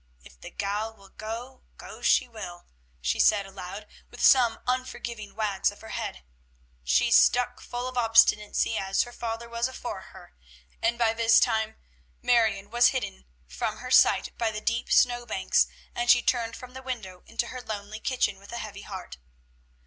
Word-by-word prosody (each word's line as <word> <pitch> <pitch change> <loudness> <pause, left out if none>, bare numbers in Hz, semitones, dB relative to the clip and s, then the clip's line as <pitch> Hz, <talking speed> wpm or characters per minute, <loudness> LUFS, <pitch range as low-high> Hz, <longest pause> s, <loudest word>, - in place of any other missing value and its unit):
"If 60 0 -17
the - - -8
gal 210 +2 -3
will 195 -1 -18
go, 235 +6 -7 0.2
go - - -11
she 255 - +3
will," 195 -7 -9 0.4
she 65 +3 0
said 200 -2 +4
aloud, 195 +1 -8 0.2
with - - -1
some 240 -4 +6
unforgiving 240 -4 -4
wags 205 -3 +1
of 205 - -12
her 220 - -11
head. 65 - -5 0.6
"She's 65 - +3
stuck 245 0 +4
full 245 +1 -5
of 255 -1 -2
obstinacy 225 -1 +3
as 195 0 +1
her 240 - -10
father 235 -1 -5
was 235 +1 -1
afore 260 - -6
her." - - -14 0.5
And 235 +1 +1
by 230 -2 +2
this 225 0 +5
time 220 0 +1 0.4
Marion 220 -4 +2
was 240 +1 +6
hidden 65 - -3 0.2
from - - -3
her - - -8
sight - - +4
by 230 - +1
the 210 -1 -4
deep 230 +2 -2
snow 245 -1 +3
banks, 190 -4 +2 0.3
and 240 0 -2
she 245 - +7
turned 230 -2 0
from 250 0 -11
the 260 - -8
window 220 -9 -6
into 230 +1 -2
her 255 - -7
lonely 215 -1 -6
kitchen 235 -7 0
with 200 +2 -14
a 235 - -4
heavy 210 -3 -7
heart. 190 - -8
225 Hz, 175 wpm, -27 LUFS, 200-240 Hz, 0.6 s, she